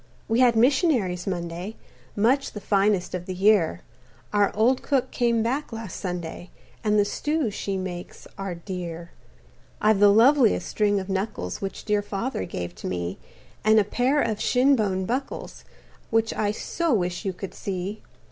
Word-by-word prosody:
"We 225 +2 +1
had 245 -2 +5
missionaries 235 - +2
Monday, 175 +3 -4 0.4
Much 250 +7 +2
the 210 - -5
finest 200 -2 +1
of 180 -1 -4
the 185 - -4
year 185 - +3 0.5
Our 205 -1 +3
old 240 +5 +3
cook 260 -3 0
came 235 -2 +1
back 260 +6 -2
last 225 -5 -6
Sunday, 175 -1 -5 0.3
And 210 -1 +2
the 205 - +4
stews 295 +1 -1
she 195 -1 -3
makes 180 -2 -6
are 195 -2 -4
dear. 170 -1 -6 0.7
"I've 215 -1 +3
the 205 0 +7
loveliest 235 +3 +5
string 205 -1 +1
of 190 - -6
knuckles 190 - -3
Which 195 -1 -5
dear 210 -1 +2
Father 205 - -3
gave 90 -1 -5
to - - -6
me, 90 0 -3 0.4
And 215 0 +6
a - - +4
pair 250 +8 +1
of 220 -6 0
shin 265 +3 +4
bone 190 -5 0
buckles 255 +6 -4 0.4
Which 225 0 +1
I 210 - 0
so 330 +10 -1
wish 180 -1 -1
you 195 - -1
could 190 +1 -7
see. 195 +2 -4
205 Hz, 165 wpm, -25 LUFS, 185-230 Hz, 0.7 s, the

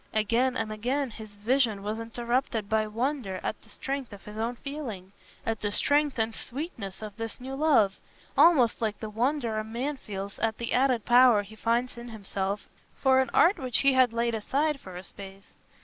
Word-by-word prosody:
Again 235 +4 +2
and 220 -1 -2
again 250 +5 -1
his 215 -1 -10
vision 220 -1 +1
was 215 +2 -3
interrupted 235 -1 -1
by 215 0 +1
wonder 230 -3 -2
at - - -3
the - - -20
strength 275 -3 -4
of 200 -1 -12
his 210 - -9
own 230 +3 -2
feeling, 235 -10 -6 0.3
at 225 -1 -2
the 205 - -1
strength 290 +5 +2
and 225 0 0
sweetness 235 - -6
of 210 -2 -7
this 225 -1 -5
new 260 +2 -6
love—almost 270 - +3
like 215 -2 -1
the 215 -1 -6
wonder 235 -1 0
a - - -2
man 245 +7 -3
feels 200 -4 -7
at 220 -1 0
the 235 - -3
added 250 -4 +2
power 240 -3 +6
he 205 +2 -13
finds 235 +2 0
in 240 0 -8
himself 200 -2 -3 0.3
for 265 -1 +4
an 260 - -1
art 365 +5 +5
which 255 -3 +1
he 275 -1 +5
had 255 -2 +5
laid 235 0 0
aside 280 +7 0
for 185 -6 -10
a 180 - -7
space. 195 0 -12
230 Hz, 190 wpm, -28 LUFS, 210-260 Hz, 0.3 s, power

